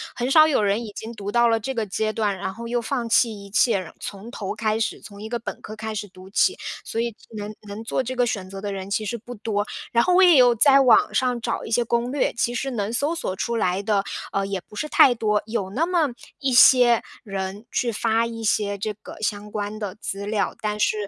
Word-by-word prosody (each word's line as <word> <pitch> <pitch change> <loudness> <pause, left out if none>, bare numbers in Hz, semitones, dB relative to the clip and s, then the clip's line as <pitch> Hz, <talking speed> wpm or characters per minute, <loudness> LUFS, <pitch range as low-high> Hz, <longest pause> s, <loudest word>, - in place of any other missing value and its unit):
很 245 +2 -2
少 310 0 +7
有 275 -8 +2
人 205 +3 +1
已 210 - -9
经 225 - -7
读 205 -3 -6
到 235 +2 +4
了 225 0 +2
这 265 +5 -4
个 225 -3 -1
阶 215 +2 -2
段， 205 -3 0
然 190 0 -4
后 235 0 -7
又 240 0 0
放 235 -1 -2
弃 220 -3 +2
一 - - -12
切， 220 +2 +3
然 185 - -9
从 205 +4 -7
头 195 -5 -5
开 215 0 0
始 225 - -2
从 200 -1 -12
一 215 - -6
个 240 +1 -2
本 230 - -6
科 215 - -8
开 220 0 -5
始 205 0 -4
读 185 0 -14
起， 375 - +2 0.3
所 230 - -2
以 235 -1 -2 0.2
能 210 0 -5
能 205 +2 -7
做 230 - -1
这 255 +1 -4
个 245 - +2
选 195 -5 -3
择 195 0 -8
的 205 0 -3
人 195 0 -6
其 215 +2 -1
实 235 +3 -3
不 245 +2 -10
多。 210 -1 -2 0.3
然 235 - +4
后 365 - +3
我 380 - +7
也 350 -6 +7
有 245 -1 +6
在 275 +4 +6
网 250 -5 +5
上 250 -2 +1
找 - - -2
一 - - -8
些 240 +1 +3
攻 235 +2 -1
略， 285 - +1
其 235 +1 -1
实 270 +2 -2
能 215 -2 -2
搜 285 +7 0
索 330 - -3
出 235 +4 -2
来 185 -2 0
的， 205 -1 +1 0.3
呃， 195 0 -1
也 195 -2 -3
不 - - -19
是 300 +9 -3
太 265 - +6
多， 210 -3 0
有 215 -4 -2
那 285 +11 +1
么 340 -6 +1 0.3
一 270 -3 0
些 245 -1 +7 0.2
人， 195 +2 -5
去 240 - +1
发 225 +1 +1
一 230 -1 -6
些 205 -2 0
这 210 +2 -3
个 205 - -12
相 210 0 -3
关 205 0 -4
的 200 -3 -5
资 200 -2 -5
料， 210 0 -1
但 210 -1 -2
是 210 - +3
220 Hz, 270 characters per minute, -23 LUFS, 205-240 Hz, 0.3 s, 少